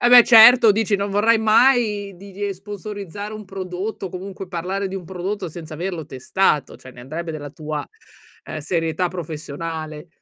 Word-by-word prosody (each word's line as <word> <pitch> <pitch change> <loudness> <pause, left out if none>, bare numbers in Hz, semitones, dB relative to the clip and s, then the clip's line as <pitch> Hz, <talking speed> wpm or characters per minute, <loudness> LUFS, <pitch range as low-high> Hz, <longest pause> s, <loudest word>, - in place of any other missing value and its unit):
Eh, 240 - +4
beh, 245 -1 +9
certo 230 -1 +8
dici: 210 -1 +1
non 200 0 -2
vorrai 220 +3 +3
mai 220 -3 +3
di 200 +1 -12
di 205 +2 -5
ehm, - - -2
sponsorizzare 205 0 -7
un 215 0 -8
prodotto, 190 +1 -5
o - - -5
comunque 190 +1 -7
parlare 190 +3 -3
di 190 - -7
un 185 - -7
prodotto 190 +2 -4
senza 160 -1 -9
averlo 175 0 -4
testato, 140 +2 0
cioè 130 - -13
ne 125 - -13
andrebbe 160 +6 -5
della 145 -2 -6
tua, 150 0 -5 0.6
ehm, - - -6
serietà 165 +3 -1
professionale. 160 -1 -6
190 Hz, 175 wpm, -21 LUFS, 160-205 Hz, 0.6 s, beh